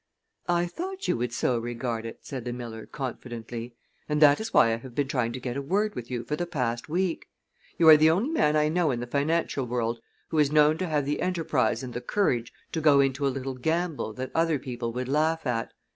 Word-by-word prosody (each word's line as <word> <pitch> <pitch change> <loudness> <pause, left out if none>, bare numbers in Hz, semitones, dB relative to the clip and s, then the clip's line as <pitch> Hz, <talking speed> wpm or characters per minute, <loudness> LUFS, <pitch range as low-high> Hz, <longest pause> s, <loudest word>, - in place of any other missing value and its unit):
"I 175 0 +3
thought 375 - -5
you - - +2
would 120 0 -2
so 120 0 0
regard 115 -1 -3
it," 115 - -10
said 130 -4 -5
the 120 0 -4
miller, 115 -2 -7
confidently, 120 -2 -6 0.3
"and 150 0 +1
that 145 -1 +6
is 220 - -4
why 115 - +5
I - - -1
have 120 +1 -11
been 145 -2 0
trying 125 -4 0
to 130 - -5
get 125 -1 -4
a 140 - -2
word 205 +9 0
with 120 - -7
you 120 -2 -3
for 150 +6 -2
the 175 +3 -3
past 125 -6 -2
week. 175 +1 -1 0.5
You 165 - +4
are 155 -1 +11
the 155 +1 +5
only 195 - +2
man 150 - +2
I 150 0 +3
know 165 0 +1
in 125 -3 -1
the 120 - -3
financial 140 0 0
world 115 -1 -1 0.3
who 160 - 0
is 145 -1 +3
known 150 +1 +4
to 185 - -1
have 150 -3 0
the 145 +1 -1
enterprise 140 -10 0
and 125 -2 -6
the 120 - -4
courage 125 - 0 0.2
to 160 - -2
go 145 -2 +6
into 140 +1 +2
a - - +3
little 135 0 -4
gamble 160 0 -1
that 130 +3 -5
other 165 -2 +2
people 120 -3 -4
would 125 +2 -4
laugh 155 +3 +1
at. 115 -3 -1
140 Hz, 235 wpm, -27 LUFS, 120-160 Hz, 0.5 s, are